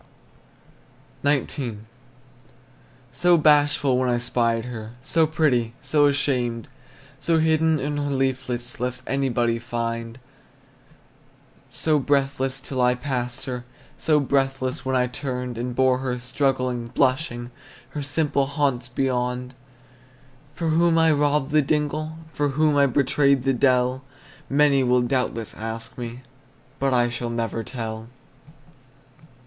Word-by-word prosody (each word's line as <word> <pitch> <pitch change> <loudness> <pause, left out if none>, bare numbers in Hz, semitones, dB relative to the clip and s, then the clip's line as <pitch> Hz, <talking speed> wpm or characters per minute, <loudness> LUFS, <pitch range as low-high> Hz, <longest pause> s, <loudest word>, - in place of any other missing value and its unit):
XIX. 135 -5 0 1.3
So 175 -1 +4
bashful 145 -3 +4
when 130 -1 +1
I 120 - +2
spied 115 -1 0
her, 115 -2 -7
So 160 +3 +2
pretty, 130 -7 +1
so 145 +2 +3
ashamed! 125 -5 0 0.5
So 165 -1 +1
hidden 160 0 +3
in 145 +2 -2
her 145 0 -1
leaflets, 130 -3 -2
Lest 125 +1 -2
anybody 120 -4 0
find; 115 -1 -4 1.5
So 155 -2 +1
breathless 135 -1 0
till 130 -1 -3
I 125 0 +4
passed 125 -2 -4
her, 125 -2 -4 0.4
So 155 -2 +3
helpless 135 -1 0
when 130 0 -1
I 125 -1 +3
turned 125 -1 -4
And 120 0 -3
bore 130 0 +3
her, 130 -1 -2
struggling, 125 -1 -1
blushing, 125 -1 0 0.4
Her 150 - -5
simple 145 -1 0
haunts 140 -4 -1
beyond! 125 -1 -1 1.0
For 165 -1 -1
whom 165 +1 +3
I 165 0 +5
robbed 145 -1 +1
the 155 0 +5
dingle, 155 +2 -1 0.2
For 145 - 0
whom 145 -1 +3
betrayed 140 0 +3
the 135 0 +2
dell, 130 0 +2 0.5
Many 140 -1 +4
will 125 0 +3
doubtless 120 -3 -1
ask 115 +1 -6
me, 120 0 -6 0.6
But 135 0 +1
I 120 -1 +3
shall 120 0 -4
never 115 -1 -2
tell! 110 -1 -5
130 Hz, 120 wpm, -24 LUFS, 120-145 Hz, 1.5 s, I